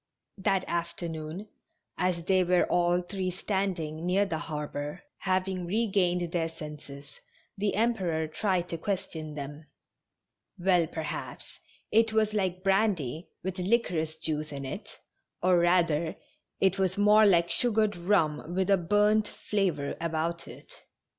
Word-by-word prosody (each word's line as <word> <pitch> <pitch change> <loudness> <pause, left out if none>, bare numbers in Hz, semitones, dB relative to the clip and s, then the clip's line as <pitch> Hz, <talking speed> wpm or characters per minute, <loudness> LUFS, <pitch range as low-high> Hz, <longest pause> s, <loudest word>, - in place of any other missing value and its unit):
That 190 -1 +1
afternoon, 170 +1 -4 0.5
as 180 -2 0
they 185 +1 +3
were 180 0 +3
all 175 0 +2
three 185 0 -3
standing 180 -4 -2
near 185 +3 +2
the 165 -5 -3
harbor, 150 - -5 0.2
having 185 -1 -1
regained 180 -4 +1
their 165 -2 0
senses, 150 -3 -10 0.4
the 205 0 -1
Emperor 190 -8 +1
tried 180 +2 0
to 165 - -4
question 160 -5 -4
them. 145 +2 -7 0.9
Well, 180 -2 +3
per 160 -1 -5
haps - - -6 0.3
it 225 0 +4
was 215 -1 +2
like 185 -3 -1
brandy 190 - +1
with 190 +1 -3
liquorice 180 -6 0
juice 155 -1 -2
in 140 -1 -5
it, 130 - -7 0.4
or, 180 -1 +5
rather, 170 -2 +2 0.4
it 190 0 +2
was 190 0 +1
more 210 +1 +6
like 170 -3 +4
sugared 220 -3 +2
rum 170 -3 +1
with 190 +1 +1
a 195 - +6
burnt 210 +4 +3
fla 200 -3 0
vor 140 -2 -4
about 170 +1 -2
it. - - -12
180 Hz, 135 wpm, -29 LUFS, 160-195 Hz, 0.9 s, more